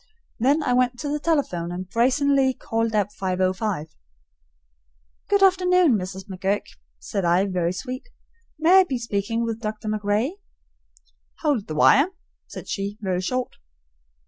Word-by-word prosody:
Then 280 +6 +2
I 250 - +1
went 250 0 +2
to 290 - -3
the 300 +1 -1
telephone 275 - -1
and 180 +1 -5
brazenly 265 +4 +2
called 225 0 -2
up 205 -1 +1
505. 185 -2 -2 1.3
"Good 405 -1 +3
afternoon, 365 -6 +4
Mrs. 190 0 -5
McGurk," 195 +1 -1 0.3
said 125 - -4
I, 175 +3 +3
very 180 -3 -1
sweet. 255 - -6 0.5
"May 340 +5 +6
I - - +6
be 270 -7 -2
speaking 230 0 -2
with 230 0 -4
Dr. 215 -1 -5
MacRae?" 215 - -1 1.1
"Howld 280 -10 +1
the 155 - -5
wire," 275 - +5 0.4
said - - -9
she, 200 +1 -4
very 185 -3 -1
short. 255 +6 -3
225 Hz, 140 wpm, -23 LUFS, 190-275 Hz, 1.3 s, May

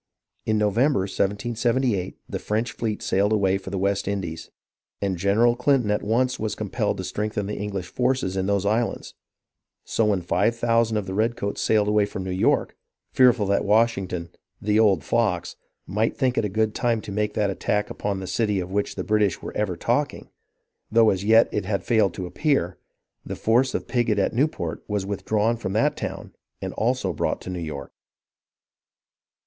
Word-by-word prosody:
In 110 -1 +2
November, 105 +4 +2
1778, 110 +2 -1
the - - -4
French 110 +3 -1
fleet 110 -2 -3
sailed 100 +2 +1
away 95 -3 +2
for 95 - -8
the 100 - -3
West 100 +1 0
Indies, 90 -5 -4 0.5
and 100 -2 -1
General 105 +7 +3
Clinton 125 -3 +2
at 105 - +1
once 125 +4 +1
was 110 -2 -2
compelled - - -2
to - - -4
strengthen 105 -1 -2
the 105 - -4
English 100 -2 -3
forces 125 -2 0
in 95 0 -1
those 100 -1 +1
islands; 110 +3 -1 0.7
so 115 - +1
when 100 -4 +1
five 100 +6 +1
thousand 115 -1 +2
of 105 - -2
the 95 - -5
redcoats 110 -1 -1
sailed 105 -2 +2
away 105 -1 +3
from 95 - -5
New 95 - -4
York, 90 - +1 0.4
fearful 125 -4 +5
that 100 0 +1
Washington, 100 -5 +1 0.3
"the 105 +1 +1
old 100 -8 +4
fox," 90 -3 0 0.3
might 110 +4 -1
think 130 -2 +1
it - - +1
a - - -1
good 110 +2 0
time 120 -2 +1
to 105 - -8
make 105 +1 -1
that 100 -2 +1
attack 105 +2 -1
upon 100 -2 -3
the 95 - -5
city 105 0 0
of 90 0 -5
which 100 +1 -1
the - - -3
British 105 -3 +1
were - - -7
ever 105 -4 -1
talking, - - -1 0.6
though 115 0 +5
as 95 0 -2
yet 110 +2 +6
it 105 - -2
had 100 0 -1
failed 110 -6 +2
to 95 - -4
appear, 115 - 0 0.4
the - - -5
force 125 +4 +2
of - - -3
Pigot 120 -4 +1
at 100 - +1
Newport 115 - -1
was 105 -2 -1
withdrawn 105 +3 0
from 95 -4 -4
that 110 - +2
town - - -6 0.3
and - - -5
also 115 -5 0
brought - - -1
to 95 - -6
New 90 - -4
York. 75 -4 -6
105 Hz, 185 wpm, -24 LUFS, 95-115 Hz, 0.7 s, yet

